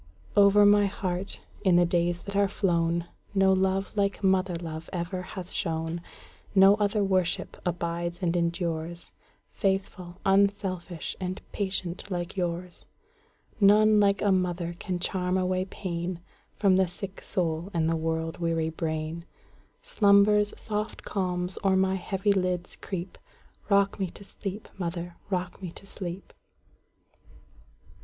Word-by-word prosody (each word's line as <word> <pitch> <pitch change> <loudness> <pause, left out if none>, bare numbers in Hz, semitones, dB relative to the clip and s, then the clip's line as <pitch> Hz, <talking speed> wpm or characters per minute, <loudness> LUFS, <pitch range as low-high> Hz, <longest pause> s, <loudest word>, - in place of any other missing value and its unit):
Over 205 0 +7
my 205 0 +6
heart, 190 -1 -2 0.2
in 185 -3 +5
the 175 0 +6
days 175 0 0
that 200 - -7
are 200 0 +4
flown, 170 -3 +1 0.3
No 195 -1 +5
love 190 +1 0
like 200 0 0
mother 190 -1 +2
love 160 -1 -6
ever 180 +1 -3
has 185 -1 -7
shone; 165 -1 -2 0.5
No 195 +1 +8
other 205 0 +1
worship 185 -3 0
abides 170 0 -2
and 170 0 +1
endures,—Faithful, 175 +2 -3
unselfish, 195 -3 +1
and 185 0 -3
patient 190 -2 -3
like 175 -1 -3
yours:None 195 +4 +1
like 200 -1 +3
a 205 - +4
mother 175 -2 0
can 185 -3 -2
charm 180 +1 0
away 185 0 0
painFrom 185 +1 -2
the 190 -1 +3
sick 190 +2 -8
soul 170 0 -1
and 165 -3 +1
the 165 - +2
world 160 0 -2
weary 165 -1 0
brain. 160 +1 -3 0.6
Slumber's 205 0 +4
soft 215 0 -4
calms 180 -2 -2
o'er 195 -1 +4
my 190 0 +3
heavy 195 +2 0
lids 180 -2 -1
creep;—Rock 200 +2 -2
me 190 - 0
to 190 - -11
sleep, 200 +1 -6
mother,—rock 175 +1 -4
me 185 - -4
to - - -11
sleep! 190 -1 -7
185 Hz, 125 wpm, -28 LUFS, 170-195 Hz, 0.6 s, No